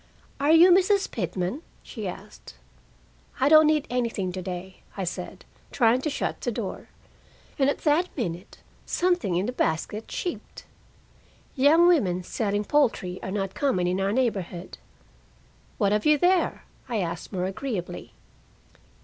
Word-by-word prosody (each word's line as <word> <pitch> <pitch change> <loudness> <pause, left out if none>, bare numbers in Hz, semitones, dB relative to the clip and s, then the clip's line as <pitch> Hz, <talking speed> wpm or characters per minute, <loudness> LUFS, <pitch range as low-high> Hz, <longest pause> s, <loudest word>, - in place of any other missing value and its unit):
"Are 285 +2 +3
you 335 +3 +8
Mrs. 385 +2 +3
Pitman?" 185 - -3 0.2
she 220 -6 -6
asked. 180 - -10 0.8
"I 265 - +3
don't 310 0 +7
need 305 -2 +2
anything 230 -7 -1
to 185 +1 -5
day," 185 +1 -7 0.2
I 195 - -2
said, 180 0 -6 0.3
trying 240 0 +3
to 305 - -1
shut 285 - -3
the - - -1
door. - - -6 0.7
And 270 0 +4
at - - -1
that 320 +4 +2
minute 180 -5 -4 0.3
something 350 - 0
in 180 +3 0
the 245 - -2
basket 210 +1 -2
cheeped. 355 - -6 0.9
Young 300 +5 +5
women 195 - +3
selling 205 +2 -1
poultry 220 -10 +1
are - - -5
not 195 -1 -3
common 250 -11 0
in 180 +2 0
our 195 +1 +1
neighborhood. 200 -7 -2 1.0
"What 200 -3 +2
have 210 +6 +1
you 300 0 +5
there?" 360 +4 +1 0.3
I 235 - -1
asked 170 -3 -4
more 185 -2 -2
agreeably. 195 -1 -5
220 Hz, 145 wpm, -26 LUFS, 185-295 Hz, 1.0 s, you